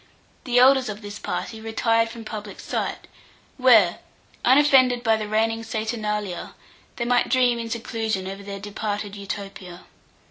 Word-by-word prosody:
The 245 -2 +1
elders 260 0 +5
of 210 +1 -7
this 205 0 -7
party 225 -1 -4
retired 225 +1 +1
from 230 -1 -9
public 210 -2 -7
sight, - - -3 0.5
where, 225 -9 +5 0.4
unoffended 255 -2 +5
by 225 -2 +4
the 215 -1 -4
reigning 225 +1 0
saturnalia, 215 -4 -3 0.4
they 235 - -3
might 245 0 +2
dream 250 -2 +3
in 230 0 -5
seclusion 225 -4 -3
over 195 +1 -6
their 200 0 -7
departed 205 0 -4
Utopia. 195 -3 -7
220 Hz, 140 wpm, -24 LUFS, 205-240 Hz, 0.5 s, elders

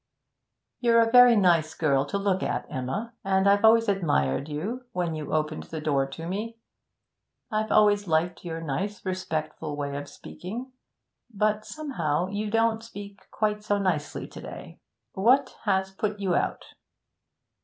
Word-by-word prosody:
'You're 230 -1 +4
a 225 0 +3
very 245 -1 +8
nice 170 -6 +3
girl 140 -3 +2
to 200 - -2
look 195 -1 0
at, - - -2
Emma, 135 - -3
and 190 0 +2
I've 200 +1 +4
always 225 +1 +6
admired 150 - +1
you 210 +13 -4
when 175 -2 -1
you 155 -1 -5
opened 155 0 -1
the 160 - -6
door 140 -3 +1
to 165 +5 -7
me. 215 +5 -4 0.9
I've 215 0 0
always 205 -1 +4
liked 165 +2 0
your 165 -2 -5
nice, 185 +8 -3
respectful 160 -4 -3
way 140 -1 -3
of 145 0 -5
speaking, 235 +9 -8 0.6
but 215 0 0
somehow 180 - -2
you 205 +2 -3
don't 225 0 +2
speak 205 -3 -10
quite 210 -1 -1
so 205 -1 +1
nicely 180 -7 -2
to - - -10
day. - - -10 0.3
What 255 +7 +3
has 190 -2 +1
put 210 +1 -3
you 190 -3 0
out?' - - -1
195 Hz, 155 wpm, -26 LUFS, 160-215 Hz, 0.9 s, very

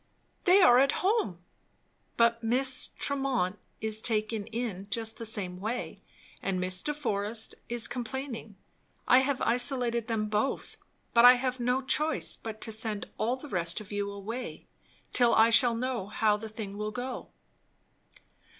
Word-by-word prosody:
"They 370 +1 +6
are 245 -7 +7
at 275 +1 +4
home." 380 - +1 0.8
"But 230 0 +3
Miss 255 +3 +1
Tremont 265 -9 -1 0.2
is 220 0 -2
taken 215 -1 -1
in 220 -4 -4
just 225 -1 -3
the 230 - -5
same 185 -4 -3
way, 225 +5 -4 0.4
and 190 -2 -1
Miss 185 0 0
de 295 - -1
Forest 220 -6 -2 0.2
is 235 -1 +2
complaining. 245 -3 -5 0.5
I 255 - +7
have 265 0 0
isolated 240 -1 0
them 220 -2 -1
both; 210 +5 -1 0.4
but 235 - +6
I 250 +1 +10
have 255 0 -2
no 250 +2 0
choice 305 +4 +2
but 220 -1 -8
to 225 - -4
send 220 -1 -3
all 235 +3 +1
the 265 +3 -10
rest 170 -7 -1
of 215 -1 -11
you 205 0 -2
away, 220 +5 -6 0.5
till 240 -2 +4
I 225 +1 +5
shall 235 0 +6
know 245 -4 -2
how 210 0 +2
the 220 +1 -7
thing 210 -2 -7
will 210 0 -2
go." 245 +4 -5
230 Hz, 155 wpm, -29 LUFS, 210-250 Hz, 0.8 s, I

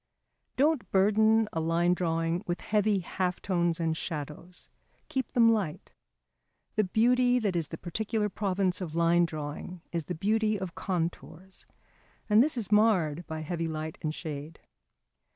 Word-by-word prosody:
Don't 295 0 +2
burden 215 +3 +4
a 165 - -1
line 165 +2 +2
drawing 165 0 -1
with 175 0 -2
heavy 210 -2 +1
half 180 0 -2
tones 175 -3 0
and 165 -1 0
shadows; 160 +2 -6 0.4
keep 260 -3 -2
them 230 -2 +6
light. 190 -9 -3 0.8
The 215 -2 +2
beauty 245 +5 +3
that 205 -6 0
is 165 -3 0
the 160 - -7
particular 210 +5 -2
province 190 -2 -1
of 165 -3 -5
line 170 +1 +4
drawing 155 +3 -6
is 170 -3 -2
the 180 - -4
beauty 215 +4 +1
of 185 -3 -5
contours, 175 0 -5 0.6
and 215 +1 +6
this 290 0 +1
is 215 -3 -4
marred 180 -7 +3
by 160 -1 -5
heavy 165 +1 -3
light 155 0 -5
and 155 - -1
shade. 155 -1 -7
180 Hz, 150 wpm, -29 LUFS, 165-215 Hz, 0.8 s, them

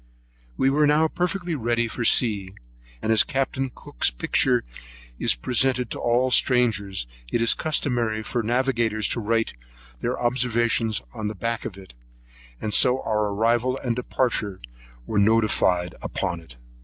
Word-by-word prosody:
We 135 - +3
were 150 +1 +3
now 150 +2 +4
perfectly 180 +1 -2
ready 120 -3 0
for 115 - -4
sea; 100 -6 +2 0.5
and 110 - +1
as 110 -1 +5
Capt. 135 -1 -2 0.2
Cook's - - 0
picture - - +1 0.6
is - - +2
presented 125 - +1
to - - -4
all 125 +2 +1
strangers, 105 - +2 0.3
it - - +1
is 115 0 +5
customary 120 -8 0
for 120 - -2
navigators 115 -2 0
to - - -1
write 115 +1 0 0.5
their - - -2
observations 120 -3 0
on 110 -3 -4
the 105 - -4
back 115 0 -3
of 95 - -6
it; 95 -8 -13 0.8
so 125 +4 +3
our 105 -1 0
arrival 115 +5 +1
and 120 -3 0
departure 115 -5 -1 0.5
was 105 -2 +1
notified 100 -5 +2
upon 85 -1 -3
it. 70 -7 -15
115 Hz, 145 wpm, -24 LUFS, 105-125 Hz, 0.8 s, as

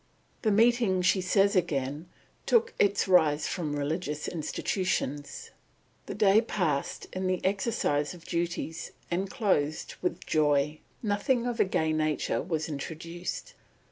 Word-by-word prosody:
The 220 - +2
meeting," 220 -3 +3
she 190 +1 +3
says 200 +2 +3
again, 150 -2 -1 0.4
"took 470 0 +3
its 205 0 +3
rise 155 -5 +4
from 155 -4 -2
religious 150 +1 -2
institutions. 155 -3 -2 0.6
The - - -5
day 205 +1 +5
passed 170 - -1
in 185 0 -2
the 185 -1 +1
exercise 190 -7 0
of 170 - -15
duties, 170 -1 -3 0.2
and 190 +3 -1
closed 185 - 0
with 180 - -2
joy. 150 0 +2 0.2
Nothing 230 +4 +1
of 245 -1 -2
a - - +5
gay 160 -4 0
nature 155 -1 0
was 160 -2 -2
introduced...." 165 - -6
175 Hz, 130 wpm, -29 LUFS, 150-200 Hz, 0.6 s, day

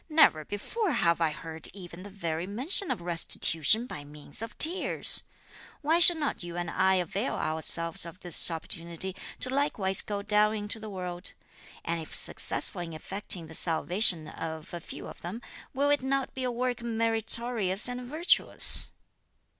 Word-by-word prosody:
"Never 305 - +4
before 320 - -3
have 170 -7 +1
I 165 - +2
heard 160 +1 -7
even 175 -2 -11
the 205 - -10
very 170 -3 -5
mention 275 - +1
of - - -3
restitution 170 - +2
by 145 -11 -8
means 145 +4 -7
of 225 +1 -8
tears! 345 +4 +1 0.6
Why 320 +3 +2
should 345 -1 +9
not 295 -2 -3
you 175 -1 -8
and 175 -1 -4
I 190 0 +2
avail 190 +6 -2
ourselves 160 +1 +1
of 170 +2 -6
this 175 -1 +5
opportunity 170 +2 +1 0.3
to 255 - 0
likewise 205 -9 +1
go 205 -1 -5
down 210 +1 +2
into 210 +1 -4
the 215 0 -8
world? 180 -1 -5 0.5
and 165 0 -2
if 160 - -9
successful 180 - -2
in 165 -2 -7
effecting 180 +1 -4
the 160 - -12
salvation 170 +1 +2
of 160 +1 -8
a 175 - -5
few - - -10
of - - -11
them, 185 +7 -6 0.3
will 285 +2 0
it 290 - +1
not 270 0 -2
be 260 -1 -4
a 250 - -1
work 245 0 -3
meritorious 225 -2 +3
and 245 0 -5
virtuous?" 310 +8 +3
195 Hz, 165 wpm, -28 LUFS, 170-240 Hz, 0.6 s, should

